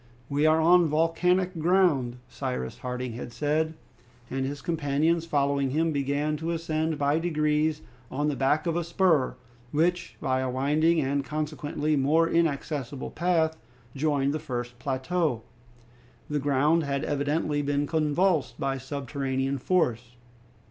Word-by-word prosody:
"We 145 Hz, +2 st, +2 dB
are 155 Hz, +1 st, +4 dB
on 170 Hz, +1 st, +5 dB
volcanic 175 Hz, +3 st, +1 dB
ground," 160 Hz, -8 st, +2 dB
Cyrus 65 Hz, 0 st, -4 dB
Harding 125 Hz, -1 st, -4 dB
had 120 Hz, +1 st, -7 dB
said, 150 Hz, +6 st, 0 dB, 0.6 s
and 135 Hz, 0 st, -1 dB
his 145 Hz, +1 st, -5 dB
companions 160 Hz, +1 st, 0 dB
following 140 Hz, -2 st, +1 dB
him 160 Hz, +4 st, +1 dB
began 145 Hz, +1 st, 0 dB
to 160 Hz, +2 st, -4 dB
ascend 160 Hz, -1 st, -1 dB
by 145 Hz, +2 st, +2 dB
degrees 155 Hz, -2 st, 0 dB, 0.3 s
on 145 Hz, +3 st, -1 dB
the 150 Hz, -, 0 dB
back 140 Hz, +5 st, +1 dB
of 165 Hz, -1 st, 0 dB
a 175 Hz, -, 0 dB
spur, 170 Hz, -5 st, +2 dB, 0.4 s
which, 175 Hz, +4 st, 0 dB
by 130 Hz, 0 st, 0 dB
a 130 Hz, 0 st, -1 dB
winding 150 Hz, +6 st, +2 dB
and 140 Hz, 0 st, 0 dB
consequently 150 Hz, 0 st, -2 dB
more 150 Hz, +4 st, +3 dB
accessible 145 Hz, -5 st, -1 dB
path, 165 Hz, -2 st, +1 dB, 0.4 s
joined 140 Hz, -1 st, +1 dB
the 155 Hz, -, -2 dB
first 120 Hz, -3 st, -5 dB
plateau. 135 Hz, 0 st, -1 dB, 0.9 s
The 150 Hz, -, +1 dB
ground 145 Hz, +4 st, +2 dB
had 140 Hz, 0 st, -2 dB
evidently 145 Hz, +1 st, 0 dB
been 145 Hz, 0 st, 0 dB
convulsed 155 Hz, -3 st, +1 dB
by 135 Hz, 0 st, -1 dB
subterranean 135 Hz, 0 st, -2 dB
force. 125 Hz, -7 st, 0 dB
150 Hz, 135 wpm, -27 LUFS, 135-160 Hz, 0.9 s, on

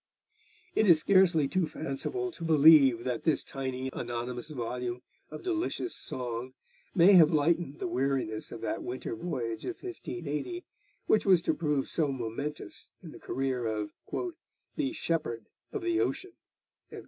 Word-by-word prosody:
It 220 Hz, -, +3 dB
is 170 Hz, -4 st, +7 dB
scarcely 175 Hz, -5 st, +4 dB
too 175 Hz, +3 st, 0 dB
fanciful 165 Hz, -, -3 dB
to 250 Hz, -, -10 dB
believe 150 Hz, -6 st, +6 dB
that 125 Hz, -3 st, -2 dB
this 160 Hz, -4 st, +1 dB
tiny 130 Hz, -1 st, -4 dB
anonymous 120 Hz, +3 st, -4 dB
volume 125 Hz, -2 st, -4 dB, 0.3 s
of -, -, -8 dB
delicious 360 Hz, 0 st, -2 dB
song 125 Hz, 0 st, -4 dB, 0.4 s
may 185 Hz, +3 st, +7 dB
have 165 Hz, -5 st, +8 dB
lightened 155 Hz, -1 st, +1 dB
the -, -, -3 dB
weariness 130 Hz, -8 st, -1 dB
of 115 Hz, -, -7 dB
that -, -, -2 dB
winter 125 Hz, -2 st, -4 dB
voyage 115 Hz, -5 st, -4 dB
of 365 Hz, -, -4 dB
1580, 345 Hz, -, -5 dB, 0.4 s
which 215 Hz, -, +2 dB
was 180 Hz, -3 st, +5 dB
to -, -, +2 dB
prove 150 Hz, -4 st, 0 dB
so 160 Hz, -3 st, +1 dB
momentous 135 Hz, +4 st, -5 dB
in -, -, -9 dB
the -, -, -12 dB
career 130 Hz, -3 st, -2 dB
of 105 Hz, -1 st, -2 dB, 0.8 s
'the 290 Hz, -3 st, -1 dB
Shepherd 150 Hz, -, -2 dB, 0.3 s
of 420 Hz, -, -4 dB
the 345 Hz, 0 st, +1 dB
Ocean.' 380 Hz, -2 st, -2 dB
150 Hz, 145 wpm, -30 LUFS, 125-180 Hz, 0.8 s, have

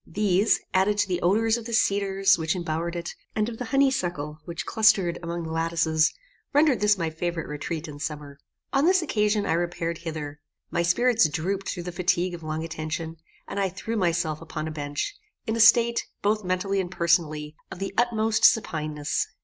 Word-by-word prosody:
These, 205 Hz, 0 st, +2 dB
added 195 Hz, +2 st, +3 dB
to 205 Hz, -, +2 dB
the 180 Hz, -2 st, -2 dB
odours 220 Hz, +5 st, +3 dB
of 235 Hz, -, -8 dB
the 235 Hz, -, -5 dB
cedars 195 Hz, -2 st, +3 dB
which 160 Hz, +2 st, -1 dB
embowered 170 Hz, 0 st, -3 dB
it, 175 Hz, +1 st, -4 dB, 0.2 s
and 215 Hz, 0 st, +1 dB
of 230 Hz, -1 st, -6 dB
the 250 Hz, -, -3 dB
honey 275 Hz, +2 st, +3 dB
suckle 155 Hz, -, -3 dB
which 175 Hz, +1 st, -5 dB
clustered 210 Hz, -6 st, +3 dB
among 170 Hz, 0 st, -4 dB
the 160 Hz, -, -5 dB
lattices, 165 Hz, -1 st, +2 dB, 0.4 s
rendered 290 Hz, -3 st, +4 dB
this 210 Hz, 0 st, +3 dB
my 165 Hz, -3 st, -2 dB
favorite 170 Hz, +1 st, -3 dB
retreat 155 Hz, +2 st, -4 dB
in 145 Hz, -1 st, -9 dB
summer. 145 Hz, -2 st, -6 dB, 0.3 s
On 275 Hz, +2 st, +3 dB
this 370 Hz, -1 st, +4 dB
occasion 210 Hz, -6 st, +1 dB
I -, -, +1 dB
repaired 170 Hz, -1 st, -2 dB
hither. 155 Hz, -3 st, -6 dB, 0.3 s
My 170 Hz, -, +1 dB
spirits 220 Hz, +2 st, +3 dB
drooped 185 Hz, +6 st, -2 dB
through 175 Hz, -, -4 dB
the 180 Hz, -, -5 dB
fatigue 180 Hz, 0 st, 0 dB
of 170 Hz, -, -7 dB
long 155 Hz, 0 st, -3 dB
attention, 160 Hz, 0 st, -5 dB, 0.3 s
and 200 Hz, -, -4 dB
I 195 Hz, -1 st, +1 dB
threw 190 Hz, +5 st, -5 dB
myself 165 Hz, -5 st, 0 dB
upon 160 Hz, -1 st, -5 dB
a -, -, -4 dB
bench, 145 Hz, -, -4 dB, 0.3 s
in 220 Hz, -2 st, -1 dB
a -, -, -2 dB
state, 235 Hz, +1 st, +5 dB, 0.2 s
both 210 Hz, +1 st, +1 dB
mentally 190 Hz, +2 st, 0 dB
and 180 Hz, -, -5 dB
personally, 160 Hz, -4 st, 0 dB
of 190 Hz, -, -8 dB
the 195 Hz, +1 st, -4 dB
utmost 225 Hz, -2 st, +1 dB
supineness. 155 Hz, -, +2 dB
175 Hz, 190 wpm, -26 LUFS, 160-210 Hz, 0.4 s, state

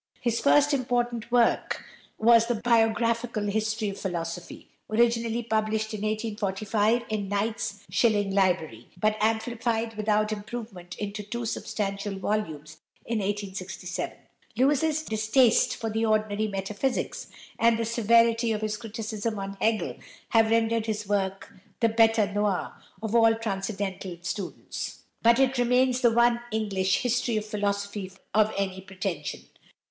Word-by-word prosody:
His 235 Hz, -2 st, 0 dB
first 290 Hz, +1 st, +4 dB
important 240 Hz, -3 st, -1 dB
work 240 Hz, -1 st, +2 dB, 0.3 s
was 230 Hz, 0 st, +5 dB
the 240 Hz, -, +1 dB
"Biographical 230 Hz, 0 st, +1 dB
History 215 Hz, +1 st, -1 dB
of 195 Hz, -, -7 dB
Philosophy," 170 Hz, -2 st, -5 dB, 0.2 s
originally 230 Hz, +1 st, +2 dB
published 220 Hz, -1 st, -1 dB
in 210 Hz, -, -4 dB
1845 215 Hz, +1 st, 0 dB
in 205 Hz, -3 st, -2 dB
Knight's 205 Hz, 0 st, -2 dB
Shilling 205 Hz, +1 st, +2 dB
Library, 175 Hz, -, +1 dB
but 215 Hz, +2 st, +2 dB
amplified 225 Hz, +1 st, 0 dB
without 215 Hz, 0 st, +1 dB
improvement 205 Hz, -4 st, -6 dB
into 205 Hz, 0 st, -4 dB
two 235 Hz, +3 st, -5 dB
substantial 200 Hz, -2 st, -3 dB
volumes 160 Hz, -7 st, -3 dB, 0.3 s
in 230 Hz, -1 st, -1 dB
1867. 190 Hz, -3 st, -4 dB, 0.4 s
Lewes's 295 Hz, +4 st, +2 dB
distaste 220 Hz, 0 st, +3 dB
for 225 Hz, -1 st, -4 dB
the 220 Hz, +1 st, 0 dB
ordinary 215 Hz, -1 st, +1 dB
metaphysics, 205 Hz, +6 st, -2 dB, 0.3 s
and 230 Hz, 0 st, +4 dB
the 230 Hz, -, -1 dB
severity 230 Hz, 0 st, +3 dB
of 215 Hz, -1 st, -1 dB
his 215 Hz, 0 st, -2 dB
criticism 220 Hz, 0 st, -4 dB
on 195 Hz, 0 st, -5 dB
Hegel, 220 Hz, -1 st, 0 dB, 0.3 s
have 225 Hz, -1 st, +4 dB
rendered 225 Hz, 0 st, +2 dB
this 210 Hz, -2 st, -3 dB
work 195 Hz, -1 st, -2 dB, 0.3 s
the 230 Hz, -, +3 dB
bête 225 Hz, -2 st, +3 dB
noir 205 Hz, -3 st, 0 dB, 0.3 s
of 220 Hz, -1 st, -3 dB
all 225 Hz, -1 st, +5 dB
transcendental 195 Hz, -4 st, -4 dB
students; 195 Hz, +1 st, -5 dB, 0.2 s
but 235 Hz, 0 st, +5 dB
it 265 Hz, -1 st, +2 dB
remains 250 Hz, +1 st, +3 dB
the 240 Hz, -, +6 dB
one 235 Hz, +1 st, +3 dB
English 200 Hz, -3 st, 0 dB
"History 245 Hz, -2 st, +1 dB
of 210 Hz, -, -2 dB
Philosophy" 200 Hz, -2 st, -2 dB, 0.2 s
of 215 Hz, +1 st, +4 dB
any 190 Hz, -1 st, -2 dB
pretension. 185 Hz, -5 st, -4 dB
215 Hz, 130 wpm, -27 LUFS, 200-230 Hz, 0.4 s, the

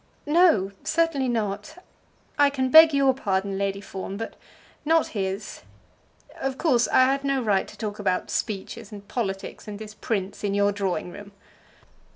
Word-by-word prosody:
"No; 295 Hz, -, +4 dB
certainly 315 Hz, -6 st, +1 dB
not. 210 Hz, -, -3 dB, 0.6 s
I 285 Hz, -1 st, +6 dB
can 260 Hz, -2 st, -1 dB
beg 320 Hz, +2 st, +9 dB
your 275 Hz, -2 st, +3 dB
pardon, 195 Hz, -5 st, -2 dB
Lady 200 Hz, 0 st, -2 dB
Fawn, 195 Hz, 0 st, -6 dB
but 225 Hz, +1 st, -6 dB, 0.5 s
not 325 Hz, +1 st, +2 dB
his. 195 Hz, 0 st, -4 dB, 0.8 s
Of 270 Hz, 0 st, -3 dB
course 255 Hz, -8 st, +2 dB
I 260 Hz, -, +5 dB
had 275 Hz, +1 st, +1 dB
no 275 Hz, -1 st, +1 dB
right 205 Hz, -3 st, +1 dB
to -, -, -13 dB
talk 210 Hz, -2 st, -5 dB
about 185 Hz, -3 st, -1 dB
speeches, 215 Hz, +1 st, -4 dB
and 200 Hz, -1 st, -10 dB
politics, 195 Hz, -5 st, -4 dB
and 205 Hz, -1 st, -6 dB
this 210 Hz, 0 st, -9 dB
prince 200 Hz, -3 st, -3 dB
in 200 Hz, -1 st, 0 dB
your 205 Hz, 0 st, +3 dB
drawing 195 Hz, -3 st, -2 dB
room." 200 Hz, +1 st, -11 dB
210 Hz, 160 wpm, -25 LUFS, 200-270 Hz, 0.8 s, beg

